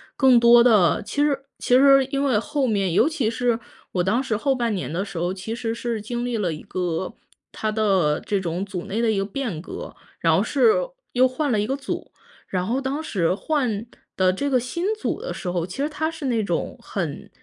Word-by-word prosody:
更 260 Hz, -3 st, +6 dB
多 235 Hz, 0 st, +7 dB
的 210 Hz, -10 st, +4 dB
其 285 Hz, -, -2 dB
实 280 Hz, -2 st, +1 dB, 0.2 s
其 250 Hz, -, +3 dB
实 275 Hz, 0 st, +7 dB
因 275 Hz, +1 st, -2 dB
为 255 Hz, -7 st, +3 dB
后 290 Hz, +4 st, -1 dB
面 200 Hz, -6 st, +1 dB
尤 -, -, +4 dB
其 290 Hz, -9 st, 0 dB
是 235 Hz, 0 st, 0 dB, 0.3 s
我 180 Hz, -, 0 dB
当 220 Hz, +8 st, +1 dB
时 230 Hz, -5 st, -1 dB
后 270 Hz, +3 st, +1 dB
半 235 Hz, -3 st, 0 dB
年 185 Hz, -6 st, -3 dB
的 175 Hz, +4 st, -1 dB
时 195 Hz, -, -8 dB
候， 175 Hz, +2 st, 0 dB
其 195 Hz, +4 st, -5 dB
实 230 Hz, -1 st, -3 dB
是 235 Hz, -2 st, -3 dB
经 240 Hz, +3 st, -3 dB
历 245 Hz, -2 st, -1 dB
了 185 Hz, -5 st, 0 dB
一 155 Hz, -, -9 dB
个 180 Hz, -1 st, -3 dB, 0.4 s
它 215 Hz, -, -2 dB
的 195 Hz, -8 st, +2 dB
这 200 Hz, -, -1 dB
种 180 Hz, +1 st, -3 dB
组 185 Hz, -3 st, -6 dB
内 215 Hz, -, -3 dB
的 230 Hz, -2 st, +2 dB
一 210 Hz, -, 0 dB
个 195 Hz, -, 0 dB
变 210 Hz, -, -4 dB
革， -, -, -8 dB, 0.3 s
然 -, -, +3 dB
后 -, -, +3 dB
是 455 Hz, -, +4 dB, 0.4 s
又 255 Hz, +1 st, +4 dB
换 275 Hz, +2 st, -1 dB
了 215 Hz, -, +2 dB
一 210 Hz, -, 0 dB
个 270 Hz, -, 0 dB
组， 275 Hz, -1 st, -5 dB, 0.4 s
然 185 Hz, -1 st, -1 dB
后 250 Hz, +7 st, 0 dB
当 275 Hz, +3 st, -2 dB
时 180 Hz, -, 0 dB
换 230 Hz, -4 st, -1 dB, 0.3 s
的 185 Hz, -1 st, +3 dB
这 280 Hz, +10 st, -2 dB
个 260 Hz, -2 st, +3 dB
新 255 Hz, +9 st, -3 dB
组 430 Hz, -, -3 dB
的 -, -, -4 dB
时 180 Hz, -, -5 dB
候， 175 Hz, -1 st, -1 dB
其 185 Hz, -, -9 dB
实 285 Hz, +2 st, 0 dB
它 315 Hz, +1 st, -1 dB
是 320 Hz, -2 st, -7 dB
那 230 Hz, -5 st, +1 dB
种 175 Hz, -4 st, -2 dB
很 165 Hz, -8 st, -4 dB
230 Hz, 245 characters per minute, -23 LUFS, 190-270 Hz, 0.4 s, 多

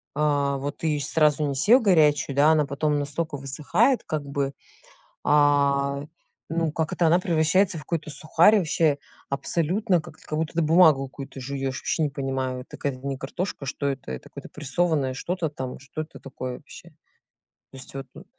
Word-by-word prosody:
А, 145 Hz, -2 st, +1 dB
вот 140 Hz, +1 st, -4 dB
ты 165 Hz, -, -2 dB
её 150 Hz, -1 st, +1 dB
сразу 150 Hz, +1 st, +2 dB
не 140 Hz, -, -2 dB
съел 220 Hz, -, +5 dB
горячую, 150 Hz, -8 st, +3 dB
да, 145 Hz, +3 st, +5 dB
она 150 Hz, -2 st, +3 dB
потом 145 Hz, +1 st, 0 dB
настолько 145 Hz, +1 st, -3 dB
высыхает 160 Hz, -, +1 dB
как 155 Hz, -2 st, -2 dB
бы, 140 Hz, 0 st, -2 dB, 0.7 s
а, 140 Hz, -1 st, +3 dB, 0.4 s
ну 165 Hz, -1 st, 0 dB
как 160 Hz, 0 st, -2 dB
это, 170 Hz, -, +2 dB
она 175 Hz, +2 st, +5 dB
превращается 180 Hz, +2 st, +2 dB
в -, -, -8 dB
какой-то 155 Hz, +2 st, -3 dB
сухарь, 165 Hz, +7 st, +4 dB
вообще 155 Hz, -4 st, +1 dB, 0.3 s
абсолютно 170 Hz, -, 0 dB
как 155 Hz, -, -13 dB
эт -, -, -20 dB
как 155 Hz, -, -3 dB
будто 160 Hz, +1 st, -1 dB
бумагу 155 Hz, -4 st, +5 dB
какую-то 135 Hz, 0 st, -9 dB
жуешь, 135 Hz, 0 st, -3 dB
вообще 160 Hz, -, 0 dB
не -, -, +1 dB
понимаю, 135 Hz, -2 st, -3 dB
это 125 Hz, -, -11 dB
какая-то 135 Hz, -1 st, -4 dB
не 135 Hz, -1 st, -3 dB
картошка, 145 Hz, +2 st, -4 dB
а -, -, -7 dB
что 140 Hz, +1 st, -2 dB
это, 135 Hz, -, -4 dB
это 65 Hz, -, -8 dB
какое-то -, -, -10 dB
прессованное 150 Hz, -2 st, 0 dB
что-то 170 Hz, +3 st, -2 dB
там, 130 Hz, -3 st, -6 dB
что 145 Hz, +3 st, -6 dB
это 155 Hz, -, -12 dB
такое 130 Hz, -2 st, -6 dB
вообще? -, -, -13 dB, 0.8 s
То 135 Hz, -, -11 dB
есть 130 Hz, -, -11 dB
вот, 135 Hz, -1 st, -5 dB
ну. -, -, -12 dB
145 Hz, 185 wpm, -25 LUFS, 140-160 Hz, 0.8 s, съел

